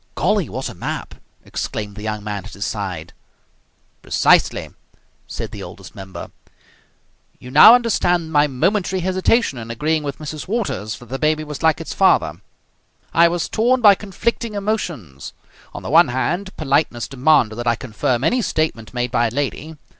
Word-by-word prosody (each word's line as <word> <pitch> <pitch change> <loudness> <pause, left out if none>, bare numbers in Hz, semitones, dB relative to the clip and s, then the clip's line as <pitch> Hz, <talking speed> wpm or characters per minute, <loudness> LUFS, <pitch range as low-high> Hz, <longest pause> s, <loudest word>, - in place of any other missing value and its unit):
"Golly! - - +1
What - - -4
a - - -7
map!" - - -5 0.3
exclaimed 105 -2 -5
the 105 - -9
young 105 -1 -4
man 105 -2 -4
at - - -11
his 100 0 -4
side. 90 -6 -5 0.9
"Precisely!" - - +2 0.6
said - - -6
the - - -8
Oldest - - -10
Member. 95 -1 -9 1.1
"You 125 - -11
now 185 - +9
understand 180 -9 +1
my 150 -1 +4
momentary 185 +7 0
hesitation 185 - +1
in 115 0 -8
agreeing 155 +7 0
with 140 -2 -5
Mrs. 155 +1 -7
Waters 195 - -2
that 120 - -15
the 135 +1 -4
baby 155 0 +1
was 150 -2 -7
like 160 -1 +3
its 165 - -6
father. 175 - +2 0.7
I 170 +1 +6
was 170 0 -1
torn 245 +4 +2
by 210 -4 +7
conflicting 210 +3 -3
emotions. 170 - -4 0.4
On - - -9
the - - -5
one - - +6
hand, 175 +10 -2
politeness 140 -5 0
demanded 130 -5 +2
that 120 0 -4
I 120 - +3
confirm 125 +1 -2
any 245 - +2
statement 155 - -2
made 120 -1 -1
by 120 -2 +2
a - - -5
lady. 145 +4 -3
150 Hz, 165 wpm, -20 LUFS, 115-185 Hz, 1.1 s, now